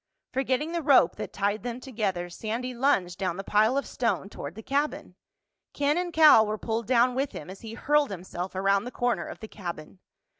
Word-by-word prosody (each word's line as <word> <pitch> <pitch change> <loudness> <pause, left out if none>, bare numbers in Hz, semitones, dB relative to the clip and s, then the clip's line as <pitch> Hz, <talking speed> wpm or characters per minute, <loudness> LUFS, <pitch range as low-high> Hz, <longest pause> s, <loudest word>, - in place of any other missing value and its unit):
Forgetting 265 +4 0
the 340 0 -1
rope 275 - +5
that - - -5
tied 205 +2 -1
them 245 0 -5
together, 210 -9 -2
Sandy 230 +7 -4
lunged 200 -9 +1
down 185 -3 -1
the 195 - -4
pile 215 +6 +3
of 280 - 0
stone 230 -5 -1
toward 145 -4 -8
the 220 - -9
cabin. 285 +4 -2 0.6
Ken 290 +1 +1
and 350 0 -1
Cal 310 -8 +7
were 215 0 -2
pulled 225 +1 -3
down 250 0 +4
with 270 +2 -2
him 165 +5 -8
as 190 - -11
he 225 0 -8
hurled 295 +3 +2
himself 185 -1 -6
around 195 +2 +2
the - - -4
corner 245 -1 -1
of - - -9
the 220 - -7
cabin. 175 -4 -8
225 Hz, 200 wpm, -27 LUFS, 195-265 Hz, 0.6 s, Cal